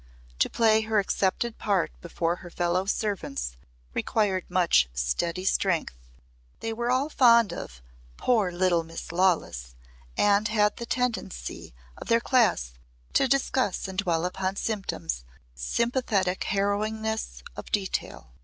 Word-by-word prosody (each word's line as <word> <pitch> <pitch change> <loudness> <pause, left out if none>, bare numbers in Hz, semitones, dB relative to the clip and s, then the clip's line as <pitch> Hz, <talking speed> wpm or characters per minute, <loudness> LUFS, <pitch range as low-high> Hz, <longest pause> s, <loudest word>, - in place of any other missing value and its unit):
To - - +3
play 220 -1 +4
her 220 0 0
accepted 205 +3 0
part 195 -4 +1
before 170 0 -1
her 175 - -11
fellow 175 +2 0
servants 190 - -2 0.4
required 195 -4 0
much 170 - +3
steady - - -1
strength. 180 - +1 0.6
They 225 - -3
were 235 +2 -2
all 260 +3 +2
fond 235 -7 +5
of 60 0 -8 0.3
"poor 215 -7 +2
little 175 -1 +2
Miss 165 0 -8
Lawless" 165 - 0 0.4
and 205 +1 +4
had 210 -1 +2
the 235 - -6
tendency 220 - -3 0.2
of - - -9
their 230 0 +4
class 230 - +2 0.4
to - - +4
discuss 260 -7 +1
and 190 0 -4
dwell 170 -4 +1
upon 185 +1 -2
symptoms 195 - -3 0.3
with 65 - -13
sympathetic 220 - 0
harrowingness 210 - -1
of - - -9
detail. 190 - -2
195 Hz, 130 wpm, -27 LUFS, 170-220 Hz, 0.6 s, fond